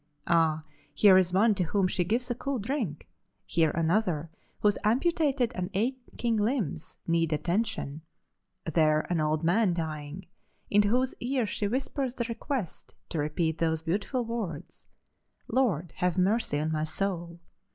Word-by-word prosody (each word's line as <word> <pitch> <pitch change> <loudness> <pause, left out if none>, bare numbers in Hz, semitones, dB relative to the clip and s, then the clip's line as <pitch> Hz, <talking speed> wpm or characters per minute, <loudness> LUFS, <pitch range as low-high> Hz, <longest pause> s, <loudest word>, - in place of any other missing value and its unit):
Ah! 160 -2 +2 0.3
here 200 -3 +7
is 185 -2 +4
one 210 +4 +4
to 190 - -2
whom 185 +3 +1
she 180 0 0
gives 235 +7 -1
a - - +2
cool 270 +2 -3
drink, 215 - -3 0.4
here 160 -1 +2
another 165 -1 0 0.3
whose 205 -1 +3
amputated 270 +1 +2
and 180 -3 -3
aching 240 0 -1
limbs 210 - -1
need 165 -1 +1
attention, 170 -1 -1 0.6
there 155 -1 +3
an 165 -3 +1
old 155 +1 0
man 180 +2 +3
dying, 155 +1 -5 0.5
into 205 0 +5
whose 250 +4 +1
ears 245 -3 0
she 205 - -1
whispers 260 +2 -2
the 240 - -1
request 230 - -4
to 165 - -3
repeat 160 +2 -1
those 160 -1 0
beautiful 205 - -1
words: 200 -9 -5 0.6
'Lord, 180 - +1
have 180 -1 0
mercy 190 -4 +2
on 155 +1 -1
my 155 -1 0
soul! 170 -1 -3
185 Hz, 145 wpm, -28 LUFS, 160-230 Hz, 0.6 s, here